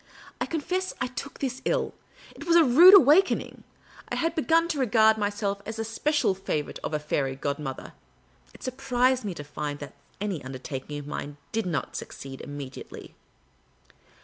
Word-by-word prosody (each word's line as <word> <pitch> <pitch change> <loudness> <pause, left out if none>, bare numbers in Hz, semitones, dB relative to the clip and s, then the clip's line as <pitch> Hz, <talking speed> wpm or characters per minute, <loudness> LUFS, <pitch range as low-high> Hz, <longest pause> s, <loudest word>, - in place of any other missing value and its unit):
I - - 0
confess 365 +4 -2
I - - 0
took 260 +2 -7
this 265 -2 -3
ill. - - 0 0.4
It - - -10
was 340 - +4
a 340 - +8
rude 330 +9 +9
awakening. 365 +3 +4 0.5
I - - -2
had 330 0 0
begun 330 +1 +2
to 300 - -1
regard 220 -3 +5
myself 205 -1 -1
as 220 - -6
the 225 0 -3
special 290 +1 +1
favourite 155 -6 -3
of 155 - -2
a - - +2
fairy 140 -3 -1
godmother; 140 0 -4 0.6
it - - -15
surprised 255 -1 +1
me 195 -4 -4
to 145 - -7
find 145 0 -5
that 145 -1 -9 0.3
any 195 -8 -3
undertaking 135 +2 -6
of 145 - -7
mine 145 0 -6
did 220 -3 -1
not 160 -5 -3
succeed 135 -1 -7
immediately. 145 -2 -8
220 Hz, 165 wpm, -27 LUFS, -, 0.6 s, rude